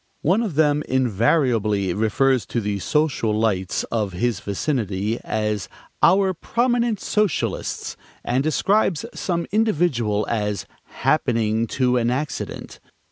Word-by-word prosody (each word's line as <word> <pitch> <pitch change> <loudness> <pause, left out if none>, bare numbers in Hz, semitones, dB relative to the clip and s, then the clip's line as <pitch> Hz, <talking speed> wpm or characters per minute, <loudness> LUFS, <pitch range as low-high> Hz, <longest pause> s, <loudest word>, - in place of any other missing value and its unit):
One 185 +9 +3
of 205 -10 -3
them 150 -1 +3
invariably 115 - +1
refers 115 +5 +1
to 120 - -1
the 105 -2 -2
social 130 -5 0
lights 95 -5 0
of 105 -5 -1
his 110 +3 -1
vicinity 105 -1 -2
as 105 -3 -2 0.3
"our 190 +2 +4
prominent 235 +3 0
socialists," 210 -6 -1 0.3
and 130 +3 0
describes 195 +3 +1
some 170 -2 -2
individual 155 - +1
as 105 -4 -2 0.2
"happening 115 -6 0
to 125 -2 +3
an 120 -1 +1
accident." 135 +2 -4
125 Hz, 115 wpm, -22 LUFS, 105-160 Hz, 0.3 s, our